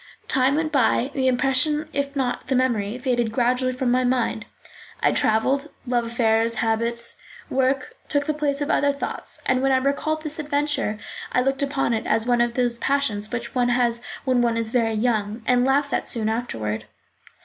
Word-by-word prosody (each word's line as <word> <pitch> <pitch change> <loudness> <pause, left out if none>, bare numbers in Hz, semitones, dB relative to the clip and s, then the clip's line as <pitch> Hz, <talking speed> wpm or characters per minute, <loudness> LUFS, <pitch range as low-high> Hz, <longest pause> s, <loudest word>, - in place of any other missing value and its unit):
Time 265 +1 +2
went 310 0 0
by, 265 -1 +2
the 260 -1 0
impression, 270 +4 +2
if 280 0 -2
not 255 -3 -2
the 265 - +1
memory, 235 -4 0
faded 245 -3 0
gradually 250 +2 +1
from 255 -1 -1
my 255 +1 +3
mind. 245 -3 0 0.5
I - - +3
travelled; 270 +7 +2 0.2
love 240 -2 0
affairs, 230 0 +1
habits, 230 +1 -1 0.3
work, 265 - 0
took 285 -1 +1
the 305 - 0
place 295 -1 -1
of 290 - 0
other 285 0 +3
thoughts, 280 - -6
and 255 0 +2
when 270 0 +2
I 260 - +4
recalled 280 +4 -1
this 305 0 -5
adventure 290 -7 0 0.3
I 250 - +2
looked 270 +2 0
upon 275 -3 0
it 220 - -2
as 220 +1 +1
one 245 -1 +2
of 240 0 0
those 240 -2 0
passions 225 -7 0
which 235 -1 -4
one 245 -1 +2
has 240 -1 +1 0.2
when 255 -2 +3
one 235 -1 +1
is 225 -1 -2
very 230 -2 +1
young, 220 -1 -1
and 250 0 +3
laughs 280 +2 +2
at - - -1
soon 220 -3 0
afterward. 115 - -3
250 Hz, 185 wpm, -23 LUFS, 230-275 Hz, 0.5 s, I